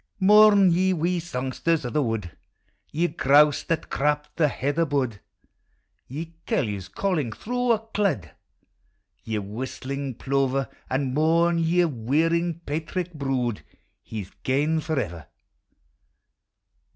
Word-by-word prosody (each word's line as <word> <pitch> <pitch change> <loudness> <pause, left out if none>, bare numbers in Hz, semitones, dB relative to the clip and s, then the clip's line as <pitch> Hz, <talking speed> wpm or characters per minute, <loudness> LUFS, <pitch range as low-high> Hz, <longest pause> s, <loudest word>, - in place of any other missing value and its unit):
Mourn, 205 -1 +7
ye 185 +2 +2
wee 175 +1 0
songsters 150 +1 -1
o' 120 - -3
the 150 - +1
wood; 110 - -3 0.6
Ye 170 +3 +1
grouse 145 -1 +4
that 165 -2 -2
crap 150 +1 0
the 155 - +3
heather 145 +4 0
bud; 135 -8 -1 0.9
Ye 160 +5 -6
curlews 100 -6 -1
calling 160 - -1
through 245 - 0
a - - +2
clud; 200 - -2 0.9
Ye 110 -1 -3
whistling 130 +5 -5
plover; 135 -1 0 0.2
And 130 -1 -1
mourn, 165 +3 +3
ye 170 +2 +3
whirring 165 +6 0
paitrick 165 +4 -3
brood; 130 -6 -2 0.5
IJe 105 -3 -4
's - - -19
gaue 150 +4 +1
forever! 115 - -3
150 Hz, 115 wpm, -25 LUFS, 130-170 Hz, 0.9 s, Mourn